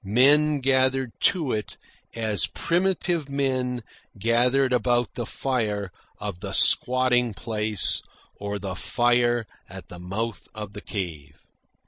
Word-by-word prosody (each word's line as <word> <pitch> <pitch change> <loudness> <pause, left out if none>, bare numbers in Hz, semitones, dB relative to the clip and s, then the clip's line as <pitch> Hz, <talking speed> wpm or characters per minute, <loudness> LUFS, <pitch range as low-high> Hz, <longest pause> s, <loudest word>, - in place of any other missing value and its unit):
Men 140 +8 +4
gathered 130 -1 +2 0.2
to 160 -9 -2
it 105 -1 -4 0.4
as 110 -6 0
primitive 175 -3 0
men 130 -3 -1 0.3
gathered 125 +5 +2
about 120 0 +1
the 120 - -4
fire 105 -7 -2 0.3
of 100 -4 -5
the 100 0 -5
squatting 125 -2 +3
place 105 - 0 0.3
or 100 0 -4
the 100 -1 -5
fire 120 +2 +2 0.2
at 95 -3 -10
the 90 - -9
mouth 105 +5 -4
of 105 -2 -7
the 105 - -8
cave. 80 -9 -6
120 Hz, 120 wpm, -25 LUFS, 105-130 Hz, 0.4 s, Men